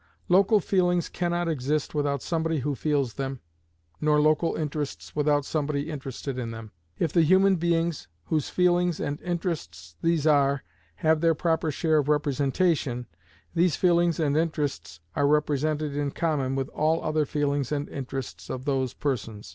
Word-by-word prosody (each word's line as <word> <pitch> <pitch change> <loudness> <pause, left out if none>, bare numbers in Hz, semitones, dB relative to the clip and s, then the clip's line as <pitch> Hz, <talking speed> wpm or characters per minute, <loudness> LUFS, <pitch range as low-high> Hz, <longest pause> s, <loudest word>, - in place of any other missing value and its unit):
Local 200 +4 +5
feelings 180 -2 +1
can 175 -1 -2
not 175 0 0
exist 150 -1 -1
without 145 -2 -1
somebody 165 -3 -1
who 145 +3 -1
feels 140 -4 0
them, 135 0 -4 0.6
nor 150 0 +3
local 155 +2 +2
interests 150 -2 -4
without 145 -1 +2
somebody 150 0 -2
interested 135 -2 -5
in 120 -2 -3
them. 115 -1 -8 0.3
If 160 +3 -1
the 170 - +5
human 190 +4 +5
beings 170 -1 0 0.2
whose 155 -3 -1
feelings 180 -1 +2
and 145 0 -3
interests 160 - -4
these 165 -3 +1
are 140 -2 +3 0.4
have 160 0 +4
their 165 -1 +3
proper 160 -1 0
share 155 +1 +2
of 145 0 -1
representation, 145 -2 +1 0.5
these 170 -3 +3
feelings 175 -2 +2
and 145 -3 +1
interests 145 - -2
are 140 - +2
represented 150 0 +1
in 145 -1 0
common 140 -4 -1
with 135 +1 -2
all 160 +2 0
other 155 -1 0
feelings 145 -2 -1
and 145 -1 -1
interests 125 - -6
of 130 +1 -5
those 135 -3 0
persons. 115 - -3
150 Hz, 155 wpm, -26 LUFS, 140-165 Hz, 0.6 s, Local